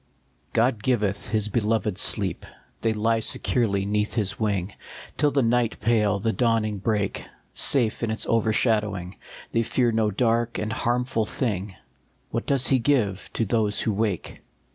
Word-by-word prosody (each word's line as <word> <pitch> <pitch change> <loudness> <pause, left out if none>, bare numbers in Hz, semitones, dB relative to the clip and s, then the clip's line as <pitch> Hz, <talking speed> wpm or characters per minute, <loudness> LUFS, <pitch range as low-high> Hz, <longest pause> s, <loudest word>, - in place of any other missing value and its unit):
OD 115 -1 +2
giveth 105 -4 0
his 110 -1 +1
beloved 110 -1 0
sleep; 100 -6 0 0.3
They 115 - +2
lie 110 +1 +1
securely 105 -3 0
neath 105 +2 -1
his 100 -4 -1
wing 100 -3 -1 0.4
Till 150 - +3
the 140 -1 +1
night 115 0 +1
pale, 105 -2 +2
the 110 +3 -1
dawning 110 -4 +1
break; 105 -1 -1 0.3
Safe 120 -6 +2
in 115 - -1
its 110 - -2
overshadowing 105 -4 +1 0.4
They 115 - +2
fear 120 +1 +1
no 110 -1 +1
dark 115 +2 +1
and 105 +1 -2
harmful 120 -1 0
thing; 105 -6 -2 0.6
What 115 - -3
does 135 -3 +2
he 130 - +3
give 115 -7 0
to 115 - 0
those 105 -1 +1
who 110 - 0
wake 105 -3 -2
110 Hz, 150 wpm, -25 LUFS, 105-115 Hz, 0.6 s, Till